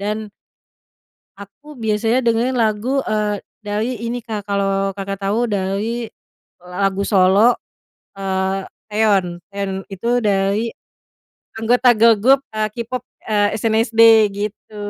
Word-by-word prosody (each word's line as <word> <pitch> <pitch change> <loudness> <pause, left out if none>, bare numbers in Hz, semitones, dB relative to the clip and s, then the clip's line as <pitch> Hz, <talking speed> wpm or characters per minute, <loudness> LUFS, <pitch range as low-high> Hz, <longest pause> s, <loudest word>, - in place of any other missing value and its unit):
dan 210 +1 -3 1.1
aku 275 +8 -13
biasanya 225 +2 +1
dengerin 235 +3 +1
lagu, 225 +4 0
eee, 210 -2 0 0.2
dari 215 +3 -3
ini 235 +1 -3
Kak, 210 -3 -6
kalo 195 0 0
Kakak 195 0 -5
tau 205 +5 0
dari 210 +3 -2 0.5
lagu 195 +2 -1
solo, 200 +4 +4 0.6
eee, 190 0 -2 0.3
Taeyon 200 -5 +1
Taeyon 200 -1 -3 0.2
itu 195 +4 -5
dari 200 +2 +1 0.9
anggota 245 +2 +4
girl 225 0 +6
group, 265 +6 +4
eee, 215 0 0
K-pop, 240 +2 -5 0.2
eee, 205 -1 +1
SNSD 225 +1 +1 0.3
gitu. 210 +1 -6
210 Hz, 115 wpm, -19 LUFS, 195-230 Hz, 1.1 s, girl